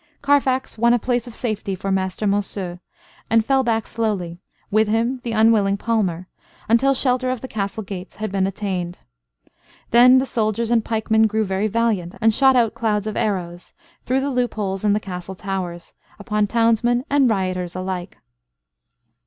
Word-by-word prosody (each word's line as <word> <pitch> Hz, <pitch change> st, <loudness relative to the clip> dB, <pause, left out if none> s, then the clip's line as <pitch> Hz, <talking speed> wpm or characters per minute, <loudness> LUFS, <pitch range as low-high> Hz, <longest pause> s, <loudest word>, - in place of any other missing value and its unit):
Carfax 270 Hz, -4 st, +1 dB
won 235 Hz, +1 st, +4 dB
a -, -, +3 dB
place 245 Hz, 0 st, -1 dB
of 235 Hz, -, -9 dB
safety 210 Hz, -4 st, -3 dB
for 195 Hz, +2 st, -4 dB
Master 190 Hz, +2 st, -1 dB
Monceux, 195 Hz, -3 st, -2 dB, 0.5 s
and 225 Hz, -1 st, +3 dB
fell 270 Hz, +1 st, +3 dB
back 225 Hz, -2 st, 0 dB
slowly, 195 Hz, -7 st, -3 dB, 0.3 s
with 215 Hz, +1 st, +3 dB
him 230 Hz, +4 st, 0 dB
the 240 Hz, -, -4 dB
unwilling 215 Hz, -3 st, +3 dB
palmer, 195 Hz, -6 st, -1 dB, 0.4 s
until 255 Hz, +5 st, +3 dB
shelter 255 Hz, -1 st, +1 dB
of 255 Hz, -2 st, -3 dB
the 260 Hz, -, -6 dB
castle 215 Hz, -1 st, -4 dB
gates 185 Hz, -2 st, -8 dB
had 215 Hz, -1 st, -4 dB
been 190 Hz, -1 st, +1 dB
attained. 185 Hz, -3 st, -4 dB, 0.9 s
Then 250 Hz, +2 st, +7 dB
the 260 Hz, -, +2 dB
soldiers 225 Hz, -1 st, -1 dB
and 230 Hz, -2 st, +3 dB
pikemen 220 Hz, 0 st, +2 dB
grew 220 Hz, 0 st, 0 dB
very 195 Hz, +2 st, -1 dB
valiant, 215 Hz, -4 st, -1 dB
and 225 Hz, 0 st, +3 dB
shot 265 Hz, +2 st, +4 dB
out 235 Hz, -3 st, +3 dB
clouds 210 Hz, -3 st, -1 dB
of 215 Hz, -, -4 dB
arrows, 180 Hz, -4 st, -3 dB, 0.3 s
through 260 Hz, +2 st, 0 dB
the 280 Hz, +1 st, -1 dB
loopholes 215 Hz, -6 st, -2 dB
in 205 Hz, -1 st, +3 dB
the 210 Hz, -, +1 dB
castle 190 Hz, -2 st, -7 dB
towers, 185 Hz, -3 st, -5 dB, 0.2 s
upon 210 Hz, 0 st, -1 dB
townsmen 235 Hz, +3 st, +2 dB
and 275 Hz, -3 st, +3 dB
rioters 185 Hz, -4 st, -2 dB
alike. 185 Hz, -1 st, -5 dB
215 Hz, 165 wpm, -21 LUFS, 190-235 Hz, 0.9 s, Then